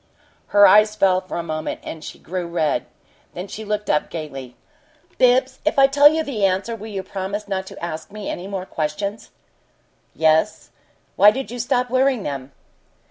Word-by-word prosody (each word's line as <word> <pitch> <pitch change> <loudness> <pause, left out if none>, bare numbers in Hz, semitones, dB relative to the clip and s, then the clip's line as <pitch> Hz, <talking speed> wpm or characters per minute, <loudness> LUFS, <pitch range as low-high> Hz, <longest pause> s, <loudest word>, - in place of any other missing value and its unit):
Her 205 0 +6
eyes 215 +1 +6
fell 185 -3 +3
for 185 - -6
a 170 - -2
moment, 155 -1 -4
and 160 - -8
she - - -8
grew 180 +1 -5
red. 165 -4 -1 0.5
Then 180 +3 -5
she 220 - -7
looked 210 0 -3
up 150 - +1
gaily. 135 -6 -7 0.6
"Bibbs, 255 +1 +3
if 310 - 0
I 275 - +7
tell 285 +2 +6
you 320 0 0
the 245 -9 -3
answer 195 +4 +1
will 220 0 -9
you 195 -3 -5
promise 195 +2 -5
not 190 -1 -3
to 170 - -7
ask 160 +1 -6
any 200 -3 -6
more 195 -2 -4
questions?" 195 +7 -4 0.9
"Yes. 160 +6 +1 0.5
Why 205 - +8
did 260 +2 -4
you 245 - -6
stop 245 +1 0
wearing 260 -3 +2
them?" 140 -1 -5
200 Hz, 175 wpm, -21 LUFS, 170-230 Hz, 0.9 s, Why